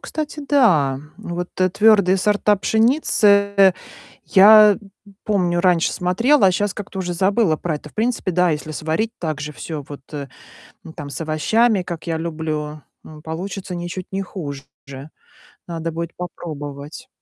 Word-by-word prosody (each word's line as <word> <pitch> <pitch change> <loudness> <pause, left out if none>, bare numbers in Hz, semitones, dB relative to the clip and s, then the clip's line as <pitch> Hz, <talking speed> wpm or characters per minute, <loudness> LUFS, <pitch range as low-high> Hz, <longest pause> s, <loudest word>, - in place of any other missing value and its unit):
кстати, 305 -1 -5
да. 160 - +3 0.2
Вот, 175 +1 -5
твердые 195 +1 +3
сорта 210 +1 +2
пшеницы 200 - +3 0.6
я 210 +1 +8 0.5
помню, 180 -4 +1
раньше 175 -2 +2
смотрела, 230 +8 +2
а 185 - +4
щас 205 +2 -1
как-то 200 -2 -6
уже 180 -1 -3
забыла 190 -1 +2
про 165 0 -3
это. 150 - -12
В - - -34
принципе, 225 -3 -1
да, 180 0 +2
если 155 0 -4
сварить 160 +9 -2
так 155 -3 -4
же 150 0 -5
всё 150 -1 -7
вот, 145 -2 -9
э, 140 -2 -6 0.7
там, 145 -2 -7
с 140 - -6
овощами, 195 +8 +1
как 170 -1 -7
я 165 -1 -1
люблю, 155 -2 -4 0.2
м, 155 -1 -12
получится 180 +4 -6
ничуть 175 +1 -6
не 195 0 -2
хуже. 145 -8 -7 1.0
Надо 165 -1 -4
будет 170 +1 -5
попробовать. 150 - -8
180 Hz, 145 wpm, -20 LUFS, 155-205 Hz, 1.0 s, я